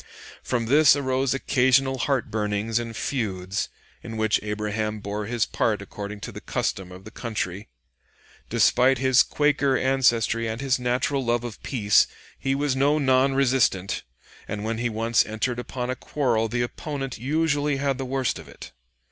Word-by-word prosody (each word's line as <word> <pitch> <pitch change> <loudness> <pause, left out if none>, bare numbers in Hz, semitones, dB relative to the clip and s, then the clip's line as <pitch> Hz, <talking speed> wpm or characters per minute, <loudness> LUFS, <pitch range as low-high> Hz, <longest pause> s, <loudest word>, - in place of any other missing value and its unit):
From 120 -2 -1
this 145 +4 +6
arose 135 -1 0
occasional 130 0 +2
heart 135 -3 0
burnings 105 +1 -1
and 115 -1 -5
feuds, 95 -7 -2 0.3
in 115 -1 -7
which 110 -1 +2
Abraham 105 0 -2
bore 105 +1 -4
his 120 -1 0
part 110 -2 0
according 100 +1 -7
to - - -6
the - - -9
custom 95 -2 -2
of 90 +1 -11
the 110 - -10
country. 105 - -4 0.8
Despite 130 +2 +4
his 130 0 +5
Quaker 145 -2 +2
ancestry 120 -4 +2
and 110 +1 -4
his 135 -1 +1
natural 125 +3 0
love 120 0 0
of 120 -4 -7
peace, 105 -6 +3 0.3
he 135 0 0
was 140 -1 0
no 140 +3 +3
non 135 -1 +3
resistant, 125 -8 +2 0.5
and 105 0 -4
when 110 +1 -2
he 120 0 0
once 115 +1 +2
entered 115 +3 -2
upon 125 0 -4
a - - -2
quarrel 120 -4 0
the 120 +2 -1
opponent 135 0 -5
usually 145 +1 +1
had 135 -1 -1
the - - -2
worst 130 0 -1
of - - -12
it. - - -11
120 Hz, 165 wpm, -25 LUFS, 110-135 Hz, 0.8 s, this